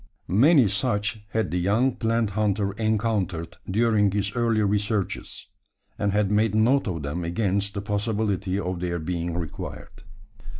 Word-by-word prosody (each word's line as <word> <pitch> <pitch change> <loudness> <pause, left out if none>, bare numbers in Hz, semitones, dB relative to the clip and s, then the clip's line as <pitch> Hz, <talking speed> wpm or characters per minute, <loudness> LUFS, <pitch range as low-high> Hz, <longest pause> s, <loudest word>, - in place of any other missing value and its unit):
Many 130 - +5
such 105 +1 -1
had 110 -1 -1
the 90 - 0
young 110 +8 +2
plant 115 -3 0
hunter 100 -1 0
encountered 100 -6 -1
during 105 0 +3
his 100 +2 -2
early 115 -3 +2
researches; 105 0 -1 0.5
and 100 -1 +1
had 105 0 +1
made 105 0 +2
note 120 +5 +3
of 85 -5 -3
them 75 +5 -3
against 100 +3 -1
the 100 - -3
possibility 105 -2 -1
of 90 -2 -3
their 85 -1 -2
being 85 +1 -3
required. 85 +3 -7
105 Hz, 140 wpm, -25 LUFS, 95-110 Hz, 0.5 s, Many